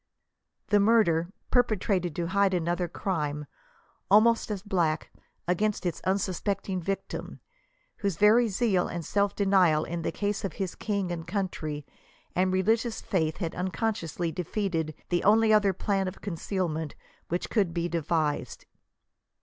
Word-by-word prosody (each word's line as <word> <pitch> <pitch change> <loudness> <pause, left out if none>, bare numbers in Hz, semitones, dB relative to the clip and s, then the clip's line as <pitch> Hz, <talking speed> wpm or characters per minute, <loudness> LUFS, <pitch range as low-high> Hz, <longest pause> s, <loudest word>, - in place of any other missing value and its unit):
The 205 - +5
murder; 200 -6 +3
— - - -41
perpe 240 -4 +3
trated 180 -6 0
to 170 - -1
hide 195 0 +3
another 175 +1 0
crime, 150 -5 -2 0.6
almost 225 +4 +5
as 200 -3 -3
black, 170 -7 0 0.4
against 205 +3 0
its 175 - -2
un 190 +1 +3
suspecting 195 0 -2
victim, 195 +3 -4 0.6
whose 200 -5 -1
very 225 +3 +5
zeal 200 -3 +1
and 170 -2 -5
self 200 +3 +1
denial 185 -6 +4
in 170 0 -4
the - - -1
cause 205 -1 -2
of 195 -5 -3
his 190 -3 -3
king 200 -4 -2
and 165 -1 -5
country 165 -6 -3 0.5
and 185 +1 +2
religious 220 +5 +1
faith 160 -4 -1
had 170 -4 -3
unconsciously 180 -3 -2
defeated 165 -3 -2
the 175 -1 +1
only 220 +2 +5
other 205 -2 +5
plan 195 +1 -1
of 185 - -6
concealment 165 -4 -3 0.3
which 175 +2 -3
could 200 -7 +2
be 170 0 -1
devised. 160 -3 -1
185 Hz, 145 wpm, -28 LUFS, 170-205 Hz, 0.6 s, The